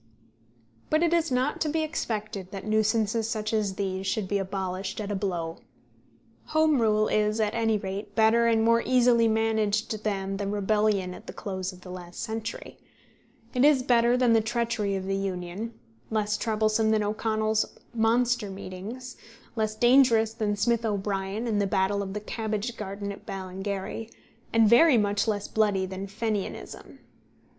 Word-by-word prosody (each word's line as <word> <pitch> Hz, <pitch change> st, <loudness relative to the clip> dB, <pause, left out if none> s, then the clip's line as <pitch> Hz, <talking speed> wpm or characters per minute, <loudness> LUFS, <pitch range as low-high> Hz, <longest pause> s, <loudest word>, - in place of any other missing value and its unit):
But 310 Hz, +2 st, +3 dB
it 340 Hz, -1 st, +2 dB
is 330 Hz, -3 st, +1 dB
not 255 Hz, +3 st, 0 dB
to 310 Hz, -, +1 dB
be 315 Hz, +1 st, 0 dB
expected 215 Hz, -, -4 dB
that 195 Hz, -1 st, -7 dB
nuisances 220 Hz, +1 st, +1 dB
such 215 Hz, -2 st, -2 dB
as 210 Hz, -3 st, 0 dB
these 190 Hz, -1 st, -3 dB
should 205 Hz, -1 st, -1 dB
be 200 Hz, +1 st, 0 dB
abolished 190 Hz, +1 st, -3 dB
at 210 Hz, -1 st, -4 dB
a -, -, -1 dB
blow. 175 Hz, -4 st, -3 dB, 0.9 s
Home 310 Hz, -4 st, +3 dB
rule 215 Hz, -1 st, +3 dB
is 215 Hz, +1 st, +1 dB
at 215 Hz, 0 st, +1 dB
any 225 Hz, -2 st, +1 dB
rate 195 Hz, +1 st, -6 dB
better 225 Hz, +1 st, +4 dB
and 225 Hz, -1 st, +3 dB
more 230 Hz, +1 st, +4 dB
easily 245 Hz, -2 st, +4 dB
managed 220 Hz, -1 st, 0 dB
than 195 Hz, -2 st, -2 dB
the 200 Hz, 0 st, -3 dB
rebellion 205 Hz, -2 st, +1 dB
at -, -, -12 dB
the -, -, -7 dB
close 190 Hz, -1 st, -4 dB
of 185 Hz, -1 st, -15 dB
the 180 Hz, -, -10 dB
last 175 Hz, -1 st, -9 dB
century; 225 Hz, 0 st, -5 dB, 0.7 s
it 250 Hz, -1 st, +2 dB
is 285 Hz, -3 st, +5 dB
better 240 Hz, 0 st, +4 dB
than 250 Hz, -2 st, +4 dB
the 225 Hz, -, +5 dB
treachery 225 Hz, -3 st, -1 dB
of 190 Hz, -1 st, -3 dB
the 195 Hz, 0 st, -1 dB
Union; 195 Hz, +3 st, -4 dB, 0.3 s
less 210 Hz, -1 st, 0 dB
troublesome 220 Hz, 0 st, +1 dB
than 215 Hz, -1 st, +2 dB
O'Connell's 215 Hz, +1 st, 0 dB, 0.2 s
monster 235 Hz, -1 st, +2 dB
meetings; 200 Hz, +7 st, -8 dB, 0.4 s
less 215 Hz, -1 st, -1 dB
dangerous 240 Hz, -2 st, +4 dB
than 215 Hz, -3 st, -1 dB
Smith 235 Hz, +2 st, +1 dB
O'Brien 200 Hz, 0 st, -2 dB
and 215 Hz, -3 st, +1 dB
the 200 Hz, -, +1 dB
battle 195 Hz, +1 st, +1 dB
of 195 Hz, 0 st, -5 dB
the -, -, -1 dB
cabbage 220 Hz, +2 st, -3 dB
garden 200 Hz, -1 st, -5 dB
at 200 Hz, -, -11 dB
Ballingary; 195 Hz, +3 st, -5 dB, 0.4 s
and 225 Hz, -1 st, +5 dB
very 255 Hz, +5 st, +6 dB
much 205 Hz, 0 st, +1 dB
less 205 Hz, -2 st, -1 dB
bloody 205 Hz, -3 st, +1 dB
than 190 Hz, +1 st, -6 dB
Fenianism. 210 Hz, 0 st, -4 dB
215 Hz, 165 wpm, -27 LUFS, 195-230 Hz, 0.9 s, very